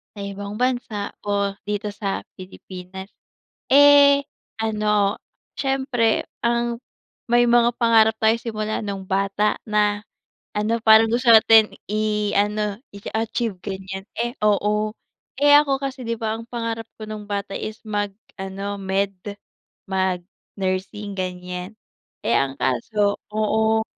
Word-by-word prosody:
sa - - -10
ibang 200 +1 -6
bansa 245 -5 -1
o 200 -1 0
dito 210 +1 -2
sa 195 -2 -3
Pilipinas. 185 0 -9 0.6
Eh, 285 0 +7 0.4
ano, 210 -2 +1 0.4
siyempre 265 -4 0 0.2
ang 235 0 +1 0.6
may 240 0 +5
mga 240 0 +5
pangarap 225 -1 +5
tayo 220 +1 +4
simula 215 -2 -3
nung 195 -2 -5
bata 200 +2 +1
na 210 -1 +1 0.5
ano 215 +2 0
parang 220 0 +7
gusto 240 +1 +2
natin 220 -1 +7 0.2
i-ano, 210 -1 0
i-achieve 220 +1 -3
ganyan. 190 -1 -5 0.2
Eh 240 +1 -1
oo, 210 +1 +1 0.5
eh 290 0 +6
ako 280 -2 +3
kasi 270 -1 -4
'di 230 0 -1
ba, 220 -1 -1
ang 230 - -9
pangarap 230 -1 -3
ko 215 - -6
nung 215 -1 -6
bata 200 -1 -3
is 215 0 -6
mag 205 -1 -1 0.3
ano, 195 +1 -4
med 195 +1 0 0.8
mag 185 -2 0 0.4
nursing 195 +2 -3
ganyan. 180 +1 -5 0.5
Eh, - - +2
ang 135 0 0
kaso, 200 - 0
oo, 220 +1 +1
210 Hz, 125 wpm, -22 LUFS, 200-230 Hz, 0.8 s, Eh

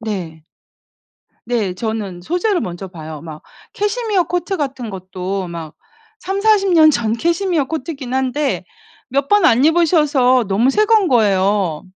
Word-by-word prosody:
네. 175 -8 -6 1.0
네. 220 -6 -1
저는 210 -4 -4
소재를 355 - 0
먼저 180 +2 -5
봐요 160 -4 -9
막. 155 -2 -10 0.3
캐시미어 415 -3 0
코트 355 +2 -2
같은 265 -6 -4
것도 190 0 -5
막 165 -2 -8 0.5
30-40 395 0 +2
년 315 -2 +7
전 225 -6 0
캐시미어 340 - 0
코트이긴 270 -3 -5
한데 265 +2 -1 0.4
몇 275 +2 -1
번 415 -3 +4
안 245 +4 +4
입으셔서 300 -7 +3
너무 225 +7 +2
새 425 +7 +2
거인 435 -4 +4
거예요. 195 -7 +1
255 Hz, 250 characters per minute, -18 LUFS, -, 1.0 s, 년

